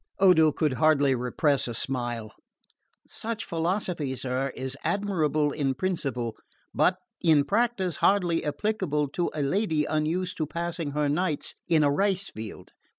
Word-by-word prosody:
Odo 170 -5 +5
could 150 -2 0
hardly 145 -3 +4
repress 130 +3 +1
a 120 - -4
smile. 120 -4 -2 0.7
"Such 225 0 +1
philosophy, 165 -4 -1
sir, 130 +1 -2
is 130 0 -4
admirable 155 -8 +1
in 140 -3 -1
principle, 135 -10 -2 0.4
but - - +3 0.2
in 155 -3 +4
practice 205 -6 0
hardly 180 -4 +2
applicable 150 -2 -1
to 175 +5 -1
a 150 - -1
lady 160 -1 +1
unused 165 +4 -1
to 155 - -1
passing 170 -2 -4
her 150 0 +1
nights 155 +1 -1
in 160 -2 +4
a 145 - +3
rice 195 +4 +1
field. 110 -1 -9
155 Hz, 140 wpm, -27 LUFS, 140-180 Hz, 0.7 s, Odo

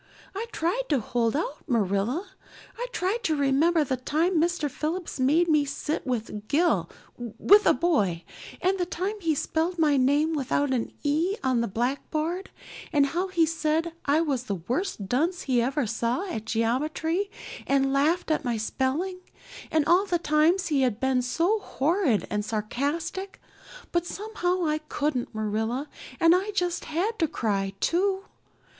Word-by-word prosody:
I 425 +4 -4
tried 350 +9 0
to 285 -4 +3
hold 230 +1 0
out, 300 -1 -2
Marilla. 235 - 0 0.4
I - - -4
tried 400 +2 -1
to 315 - +2
remember 295 +4 +3
the 260 -2 -1
time 315 +6 +1
Mr. 340 -3 +1
Phillips 320 +4 -4
made 305 +7 +3
me 305 -3 +4
sit 285 +1 -3
with 215 -4 -3
Gil 340 +4 +2 0.3
with 370 - +4
a - - +7
boy; 210 - +1 0.4
and 380 +1 +1
the 355 - +1
time 375 +3 -2
he 325 -3 +1
spelled 325 +5 -1
my 300 -3 +3
name 290 +5 +3
without 285 -1 0
an 240 -3 -1
'e' 315 +7 +1
on 255 -3 +2
the 235 - 0
blackboard; 305 - -2 0.4
and 290 -3 +4
how 345 +7 -1
he 350 -3 +3
said 320 +1 0
I 290 +3 +3
was 275 -6 -1
the 200 - -2
worst 235 - -3
dunce 325 - 0
he 250 -3 +2
ever 265 +3 0
saw 235 - -1
at 225 - -4
geometry 310 - 0 0.4
and 270 0 +2
laughed 315 +5 +2
at 310 - +1
my 240 -3 -1
spelling; 275 - -1 0.5
and 310 -2 +2
all 355 +5 +4
the 355 - +2
times 330 +3 +2
he 285 -3 +2
had 245 -5 +1
been 265 -1 +2
so 335 - +1
horrid 310 - +1
and 210 0 0
sarcastic; 285 - -3 0.5
but 345 0 0
somehow 370 -4 -2
I 305 0 +1
couldn't, 295 -6 -2
Marilla, 220 +6 -1 0.3
and 330 -1 +6
I 380 +3 +1
just 355 -2 -1
had 370 +9 -1
to 325 - +3
cry 195 -7 -1
too. 380 - +1
305 Hz, 160 wpm, -26 LUFS, 255-345 Hz, 0.5 s, a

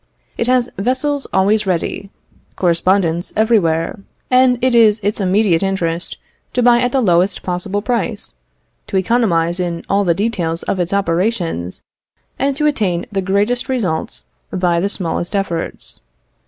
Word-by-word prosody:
It 235 - -2
has 250 -1 +3
vessels 260 +6 -1
always 205 +2 +2
ready, 185 +2 -2 0.5
correspondents 175 -1 +1
everywhere; 200 -5 +1 0.3
and 255 0 +5
it 255 0 +1
is 220 -2 +5
its 205 +1 -1
immediate 190 -2 +2
interest 175 -3 -1 0.4
to 250 - +1
buy 240 0 +5
at 245 0 +1
the 265 - +2
lowest 185 -2 +2
possible 190 +3 -3
price, 240 +1 -2 0.5
to 195 - -1
economize 185 -5 +1
in 170 -2 -3
all 200 +1 +2
the 170 -3 +2
details 180 -5 -2
of 190 - -2
its 175 0 -1
operations, 175 - -1 0.6
and 275 +1 +1
to 300 +2 0
attain 205 -11 0
the 195 -1 -1
greatest 205 +7 0
results 200 -12 -2 0.3
by 180 -2 +1
the 195 +4 0
smallest 175 -1 -2
efforts. 175 -4 -3
195 Hz, 140 wpm, -17 LUFS, 175-235 Hz, 0.6 s, and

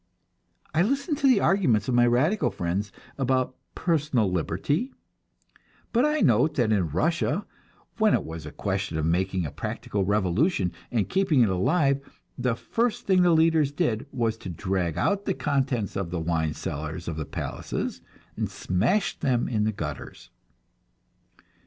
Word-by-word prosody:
I 160 - +3
listen 275 - 0
to 275 - +2
the 250 -6 +5
arguments 125 - +2
of 130 - 0
my 120 0 +5
radical 130 - +2
friends 95 +1 -2 0.3
about 130 -1 +1 0.2
"personal 150 - +1
liberty," 95 - -1 1.0
but 240 +4 +4
I 300 0 +1
note 125 +6 +3
that 120 -5 +2
in 95 -6 +2
Russia, 160 - 0 0.5
when 215 -1 +5
it - - -1
was 80 -1 -7
a - - -7
question 95 -3 -2
of 80 - 0
making 90 +2 0
a 75 - -4
practical 100 -2 -3
revolution 100 - +1 0.2
and 110 -5 0
keeping 190 -8 +2
it 115 - +4
alive, 140 - +2 0.3
the 125 -2 0
first 230 - -1
thing 190 -2 +4
the 180 - +5
leaders 160 -3 +4
did 145 -7 -1
was 115 -3 -1
to 95 - -8
drag 90 -1 -2
out 200 0 +1
the 195 - 0
contents 135 -7 -1
of 95 -3 -2
the 90 0 -3
wine 80 -2 -1
cellars 80 +3 -5
of 85 - -3
the 80 - -3
palaces, - - -4 0.3
and - - -2
smash 120 - 0
them 125 -5 +1
in 105 -3 0
the 110 - +1
gutters. 100 - -7
120 Hz, 160 wpm, -26 LUFS, -, 1.0 s, the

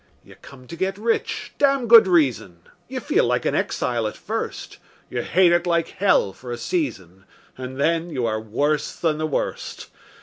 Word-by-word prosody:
You - - -16
come 130 -2 -15
to 170 - -9
get 190 +3 -2
rich 225 +2 -2
(damned 275 -3 +2
good 225 -3 +8
reason); 130 - +1 0.3
You - - -5
feel - - +1
like - - 0
an - - +1
exile 115 -3 -1
at 105 - -7
first; - - -5 0.3
You 120 - -2
hate 175 +6 +3
it 175 +1 +2
like 170 -1 +1
hell 185 - +2
for 125 +5 -10
a 120 - -3
season, 95 - -4 0.3
And 130 +1 -7
then 165 +3 +1
you 130 -7 -2
are 110 -1 -1
worse 145 +7 -1
than 155 -2 -1
the 155 - -1
worst. 150 - -4
155 Hz, 180 wpm, -22 LUFS, 120-180 Hz, 0.3 s, good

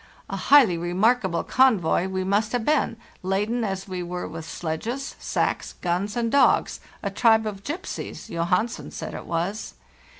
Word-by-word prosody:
A - - -2
highly 245 -12 +5
remarkable 190 +2 +1
convoy 205 -9 +3
we 190 0 -2
must 205 +4 +1
have 240 -2 0
been, 300 -6 +1 0.2
laden 210 +6 0
as 195 -2 -3
we 185 -2 -4
were 180 0 -4
with 160 -1 -7
sledges, 225 - -4
sacks, - - -1
guns, 185 +5 -2
and 230 -1 0
dogs; 280 - +3 0.2
a - - -2
tribe 220 -2 +4
of 200 -2 -5
gypsies, 325 - -5
Johansen 180 +7 -1
said - - -6
it - - -7
was. 175 +6 -3
200 Hz, 155 wpm, -25 LUFS, 180-235 Hz, 0.2 s, highly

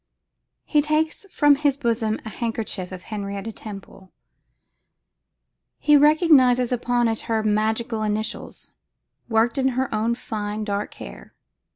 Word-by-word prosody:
He 300 - +3
takes 310 +5 -1
from 290 -4 +4
his 285 -2 +1
bosom 230 -4 0
the 220 - -6
handkerchief 220 -5 -4
of 185 -1 -8
Henrietta 200 0 -5
Temple. 195 -3 -11 1.7
He 295 - +4
recognises 285 -5 +5
upon 245 -1 +1
it 225 -1 -1
her 220 -1 +1
magical 220 +2 0
initials, 215 0 -4 0.6
worked 230 +3 +2
in 265 - +2
her 260 -2 -1
own 225 +2 0
fine 215 -2 -4
dark 205 -1 -3
hair. - - -11
225 Hz, 120 wpm, -23 LUFS, 210-260 Hz, 1.7 s, recognises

